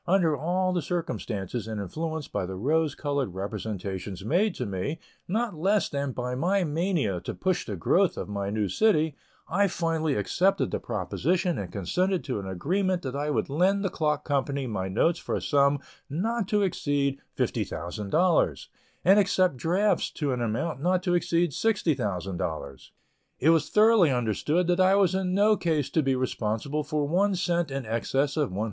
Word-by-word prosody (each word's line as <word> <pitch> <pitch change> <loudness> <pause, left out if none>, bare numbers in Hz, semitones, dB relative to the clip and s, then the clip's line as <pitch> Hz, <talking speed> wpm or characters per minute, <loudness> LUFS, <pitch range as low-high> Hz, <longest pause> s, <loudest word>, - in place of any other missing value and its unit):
Under 170 -4 +3
all 180 +5 0
the 175 - 0
circumstances, 120 - -3
and 110 -2 -4
influenced 155 - -4
by 90 - -1
the 95 - -5
rose 150 +8 +1
colored 140 - -2
representations 100 -1 -5
made 180 - +2
to 125 - -3
me, 100 - -3 0.3
not 220 +4 -1
less 195 +6 +1
than 140 -1 -2
by 125 0 -3
my 180 +9 +1
mania 155 - 0
to - - -5
push 185 -1 -1
the 105 - -3
growth 85 - +2
of - - -4
my 100 -1 -3
new 105 0 0
city, 160 - +2 0.3
I 200 +4 +2
finally 165 -4 -1
accepted 180 - +1
the - - -1
proposition 175 - -1
and 95 -3 -5
consented 180 - 0
to 125 -7 -3
an 95 - -6
agreement 180 - -1
that 130 -1 -4
I 145 +1 -1
would 150 - 0
lend 190 +7 +2
the 190 - 0
clock 150 -2 -1
company 140 -1 -1
my 100 -6 -3
notes 165 - +1
for - - -3
a - - 0
sum 140 0 +3 0.3
not 210 +8 -1
to 210 -1 +2
exceed 145 -6 0 0.2
$50,000, 100 - 0 0.4
and 195 +4 +7
accept 185 -5 +2
drafts 185 - +1
to 145 -3 -1
an 125 -1 -2
amount 125 +6 -2
not 180 +2 +1
to 180 -2 +1
exceed 170 -1 +1
$60,000. 100 - -2 0.5
It 155 +5 +4
was 165 -2 +2
thoroughly 215 -5 +5
understood 130 - +1
that 175 +1 +1
I 185 +1 +5
was 195 -3 +3
in 190 -1 0
no 210 +2 +5
case 155 -7 -1
to 160 - +2
be 135 -2 +1
responsible 130 +3 -2
for 150 -1 -1
one 195 +5 +2
cent 175 -3 0
in 135 -1 -4
excess 135 +5 0
of 150 -4 +1
$110,000. 95 - -5
150 Hz, 175 wpm, -27 LUFS, 120-180 Hz, 0.5 s, and